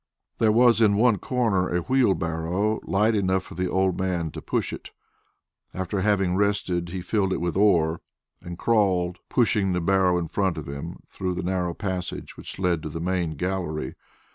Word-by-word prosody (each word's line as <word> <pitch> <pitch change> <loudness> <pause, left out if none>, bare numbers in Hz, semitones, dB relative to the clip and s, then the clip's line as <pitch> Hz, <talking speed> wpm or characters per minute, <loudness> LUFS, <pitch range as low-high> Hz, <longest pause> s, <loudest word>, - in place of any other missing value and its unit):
There 110 -1 +4
was 120 +1 +5
in 105 -2 +5
one 110 -1 +3
corner 110 -7 0
a 90 0 0
wheelbarrow 95 -4 +1
light 105 +3 +2
enough 95 -2 +1
for - - -11
the 90 +1 -2
old 95 -1 +1
man 90 -4 -1
to - - -7
push - - -2
it. - - -8 0.9
After 95 +2 -2
having 95 -3 +2
rested, 95 -4 0
he 90 +1 -4
filled 95 0 0
it - - 0
with 85 0 -2
ore, 85 -5 +3 0.4
and 85 0 -8
crawled, 95 -5 +1
pushing 105 -6 +2
the 90 - 0
barrow 90 0 +2
in 85 -1 -2
front 95 -1 0
of 80 - -6
him, 70 0 -7
through 90 -1 -3
the - - -3
narrow 90 -2 -1
passage 95 -3 -4
which - - -9
led 90 -4 0
to 80 - -5
the 80 - -5
main 85 -2 -1
gallery. 90 -2 -3
95 Hz, 180 wpm, -25 LUFS, 85-100 Hz, 0.9 s, was